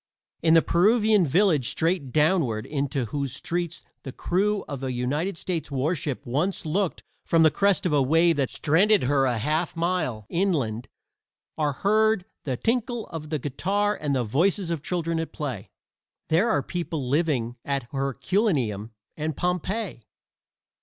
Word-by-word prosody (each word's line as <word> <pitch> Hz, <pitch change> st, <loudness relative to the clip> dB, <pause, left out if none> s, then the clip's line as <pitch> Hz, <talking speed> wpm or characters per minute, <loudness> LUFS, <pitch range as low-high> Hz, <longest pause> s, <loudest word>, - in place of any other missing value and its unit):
In 160 Hz, 0 st, +5 dB
the 165 Hz, -, +6 dB
Peruvian 210 Hz, 0 st, +3 dB
village 160 Hz, -, +3 dB
straight 165 Hz, -5 st, 0 dB
downward 150 Hz, -, +2 dB
into 140 Hz, -3 st, -2 dB
whose 140 Hz, +3 st, -3 dB
streets 170 Hz, +2 st, -3 dB, 0.2 s
the 135 Hz, -, -7 dB
crew 200 Hz, +8 st, 0 dB
of 140 Hz, -2 st, -6 dB
a 130 Hz, -, -1 dB
United 145 Hz, +9 st, -2 dB
States 170 Hz, -3 st, -3 dB
warship 140 Hz, 0 st, -2 dB
once 155 Hz, +10 st, -1 dB
looked 185 Hz, +3 st, -1 dB, 0.2 s
from 165 Hz, -1 st, +3 dB
the 160 Hz, -, +6 dB
crest 200 Hz, -2 st, +2 dB
of 170 Hz, -, +1 dB
a 145 Hz, -, +4 dB
wave 165 Hz, +5 st, +4 dB
that 135 Hz, -3 st, +1 dB
stranded 190 Hz, +6 st, +3 dB
her 135 Hz, +1 st, +2 dB
a 125 Hz, -3 st, +1 dB
half 155 Hz, +9 st, -1 dB
mile 165 Hz, -, -1 dB
inland 145 Hz, -, -1 dB, 0.7 s
are 150 Hz, -2 st, 0 dB
heard 215 Hz, +4 st, +2 dB, 0.2 s
the 130 Hz, -4 st, -2 dB
tinkle 240 Hz, -, -1 dB
of 155 Hz, -2 st, -7 dB
the 155 Hz, -, 0 dB
guitar 195 Hz, +10 st, -1 dB
and 145 Hz, -2 st, -2 dB
the 125 Hz, -, +1 dB
voices 170 Hz, -, +1 dB
of 165 Hz, -4 st, -2 dB
children 165 Hz, 0 st, -2 dB
at 165 Hz, -, -4 dB
play. 125 Hz, -, -5 dB, 0.6 s
There 180 Hz, +9 st, +3 dB
are 220 Hz, -, +1 dB
people 165 Hz, -6 st, -4 dB
living 130 Hz, -5 st, 0 dB
at 140 Hz, -2 st, -2 dB
Herculaneum 135 Hz, -, -1 dB, 0.2 s
and 155 Hz, -1 st, -3 dB
Pompeii. 180 Hz, -, -2 dB
160 Hz, 155 wpm, -25 LUFS, 135-185 Hz, 0.7 s, the